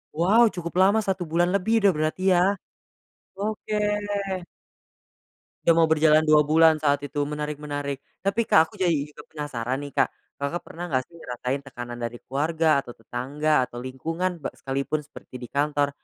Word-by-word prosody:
Wow, 200 +9 +5
cukup 170 -1 -5
lama 200 +3 +5
1 190 -2 -1
bulan 175 +2 +2
lebih 200 +4 +1
udah 200 - +6
berarti 155 +4 -1
ya? 175 - +4 1.0
Oke. 215 +1 -4 1.9
Udah 170 - +6
mau 165 -1 +5
berjalan 155 0 +5
2 155 -1 +6
bulan 160 +1 +5
saat 145 -2 +1
itu, 145 +1 -4
menarik 150 0 -4
menarik. 145 -2 -4 0.2
Tapi 195 +4 +1
Kak 160 -7 +5
aku - - -23
jadi 175 -3 +2 0.2
juga - - -13
penasaran 135 -4 -4
nih 145 -1 -7
Kak, - - +3 0.3
Kakak 140 +5 -3
pernah 175 +2 -8
nggak 130 -1 +1
sih 170 - -18
ngerasain 125 0 -4
tekanan 120 -2 -7
dari 120 0 -4
keluarga 155 +3 +1
atau 120 - -10
tetangga 130 +5 0
atau 120 0 -9
lingkungan 165 +8 -3
be - - -4
sekalipun 140 +3 -2
seperti 125 -3 -12
di 120 - -8
kantor, 145 0 +1
150 Hz, 165 wpm, -25 LUFS, 140-170 Hz, 1.9 s, udah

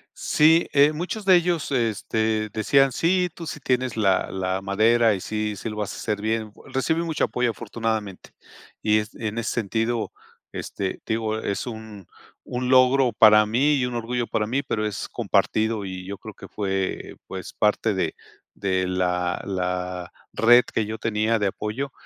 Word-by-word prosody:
Sí, 160 +2 +4
eh, 145 +2 +5
muchos 185 +7 -4
de 190 -1 +7
ellos, 175 -3 +1
este, 110 -2 0
decían 135 +6 +3
sí, 180 +5 +1
tú 170 - -8
sí 155 - -6
tienes 125 -2 0
la 95 -4 +2
la 95 0 -2
madera 110 +3 +3
y 95 - -4
sí, 105 0 -2
sí 105 - -5
lo 105 - -7
vas 105 -2 -3
a - - -8
hacer 105 -2 -2
bien. 110 0 -1 0.2
Recibí 160 +5 0
mucho 160 -2 0
apoyo, 125 -1 0
afortunadamente, 110 -3 -4 0.5
y 105 0 +3
es 105 +1 -6
en 110 -1 -4
ese 115 - -1
sentido 115 +1 -1 0.4
este, 95 -2 -4
digo, 110 -1 -1
es 100 +3 -3
un 110 -5 -8 0.4
un 125 0 -3
logro 130 0 +5
para 105 0 +7
mí 130 +8 +2
y 130 -3 +1
un 125 - -4
orgullo 120 +1 -2
para 105 - -1
mí, 135 +5 -1
pero 110 -6 -2
es 105 - -5
compartido. 110 -1 0
Y 95 -1 -6
yo 100 0 -5
creo 110 +2 -10
que - - -12
fue, 95 -2 -3
pues, 95 -1 -7
parte 105 +1 +1
de 95 - -1 0.4
de 95 -2 0
la 90 -1 0
la 90 -1 -3 0.2
red 120 +2 +6
que 110 - -2
yo 110 +1 -4
tenía, 110 +1 0
de 105 -2 0
apoyo 105 +8 -4
110 Hz, 175 wpm, -24 LUFS, 100-125 Hz, 0.5 s, de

